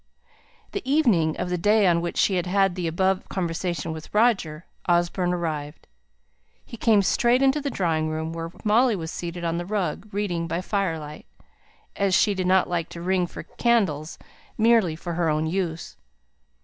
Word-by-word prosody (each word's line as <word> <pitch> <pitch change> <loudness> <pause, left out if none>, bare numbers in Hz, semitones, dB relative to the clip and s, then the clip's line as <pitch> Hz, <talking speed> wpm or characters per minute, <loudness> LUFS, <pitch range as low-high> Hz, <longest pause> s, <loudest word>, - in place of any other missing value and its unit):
The 400 - -3
evening 195 - +3
of 180 0 -3
the 180 - -1
day 210 +3 +4
on 170 -2 +3
which 170 - -4
she 195 - +3
had 180 0 -2
had 195 0 +2
the 175 -2 -3
above 190 +3 0
conversation 175 -2 -2
with 160 -1 -9
Roger, 195 -8 +2 0.2
Osborne 175 +1 +1
arrived. 155 -4 -4 0.8
He 235 - -9
came 215 -3 +3
straight 240 +6 +3
into 270 +2 +3
the 285 - -2
drawing 160 -8 0
room, 160 +1 -3
where 165 0 -5
Molly 230 +2 +3
was 160 -3 -5
seated 175 0 -6
on 170 0 -1
the 175 - -4
rug, 200 -1 -2
reading 180 -5 -2
by 170 +1 -2
firelight, 165 -7 -3 0.7
as 195 -2 +2
she 205 +3 +3
did 185 -2 -2
not 185 0 +4
like 170 -2 -2
to 170 - -9
ring 185 -1 +1
for - - -9
candles 190 -11 0 0.4
merely 220 -7 +3
for 170 +1 -6
her 165 -1 0
own 155 +1 0
use. 170 -1 -3
180 Hz, 175 wpm, -24 LUFS, 165-200 Hz, 0.8 s, day